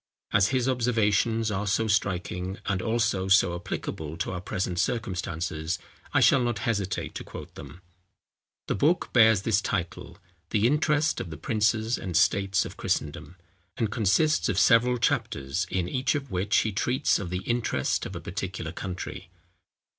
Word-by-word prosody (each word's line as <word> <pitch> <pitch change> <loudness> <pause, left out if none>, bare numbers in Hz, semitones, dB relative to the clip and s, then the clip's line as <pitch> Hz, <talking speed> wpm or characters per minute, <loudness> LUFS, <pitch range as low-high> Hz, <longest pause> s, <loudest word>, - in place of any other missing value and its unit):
As 100 -1 +5
his 130 +2 0
observations 115 -3 +1
are 105 +1 -2
so 110 +3 +1
striking, 95 -2 -1
and 95 -2 -1
also 115 -4 0
so 95 -2 +4
applicable 80 -2 -5
to 90 - -2
our 90 -1 -4
present 90 -1 -2
circumstances, 85 -7 -2 0.3
I - - +3
shall 135 - +5
not 120 -2 0
hesitate 100 -6 -2
to - - -6
quote - - -10
them. 90 - -11 0.8
The - - -1
book 155 - +1
bears 110 -4 +5
this 110 -1 +2
title, 90 -5 -4 0.3
The 105 +1 +1
Interest 150 +3 +2
of 85 - -6
the 80 - -7
Princes 110 +5 0
and 90 -4 -2
States 95 +1 +2
of - - -9
Christendom, 75 +4 -3 0.4
and 110 -3 -1
consists 115 +9 +2
of 100 - -1
several 125 +3 +4
chapters, 80 - -1
in 90 -2 -1
each 130 +9 0
of 140 -4 -4
which 95 +3 +1
he 110 - -1
treats 120 +5 +1
of 95 -4 -5
The 90 +1 -3
Interest 120 +1 0
of - - -9
a - - -4
particular 95 -3 -5
country. 90 0 -6
100 Hz, 160 wpm, -27 LUFS, 90-115 Hz, 0.8 s, As